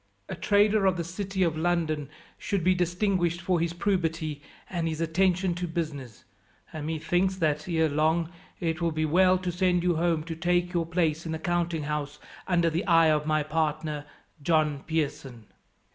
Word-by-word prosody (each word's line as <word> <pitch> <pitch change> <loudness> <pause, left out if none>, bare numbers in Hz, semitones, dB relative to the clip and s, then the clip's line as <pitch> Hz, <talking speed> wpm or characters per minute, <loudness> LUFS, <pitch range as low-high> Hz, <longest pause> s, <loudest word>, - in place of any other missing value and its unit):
A - - -5
trader 205 0 +3
of 185 -1 +2
the 170 - -2
city 190 +2 -2
of 165 -3 +1
London 160 -3 0 0.3
should 195 -4 -1
be 185 +2 +4
distinguished 180 -1 0
for 180 0 0
his 165 0 0
probity 165 -5 -1 0.3
and 170 -3 -2
his 160 -1 -3
attention 180 +2 +1
to 175 +1 -3
business; 150 - -5 0.5
and 155 -1 -5
methinks 175 +4 0
that, 155 -2 -1
ere 160 -2 +2
long, 160 +3 +1 0.3
it 165 -2 -2
will 170 - +2
be 155 0 -1
well 185 +4 +4
to 180 -1 -3
send 180 0 +1
you 175 -2 +2
home 165 -2 +1
to 165 0 -6
take 175 +2 0
your 170 -2 0
place 165 -1 0
in 160 - -3
the - - -2
counting 170 -1 -1
house 150 0 -3 0.3
under 170 -2 +2
the 170 +5 -2
eye 165 -2 +5
of 150 0 0
my 155 -1 +2
partner, 155 -1 -2 0.3
John 155 -2 +2
Pearson. 140 -7 -3
165 Hz, 175 wpm, -27 LUFS, 155-180 Hz, 0.5 s, eye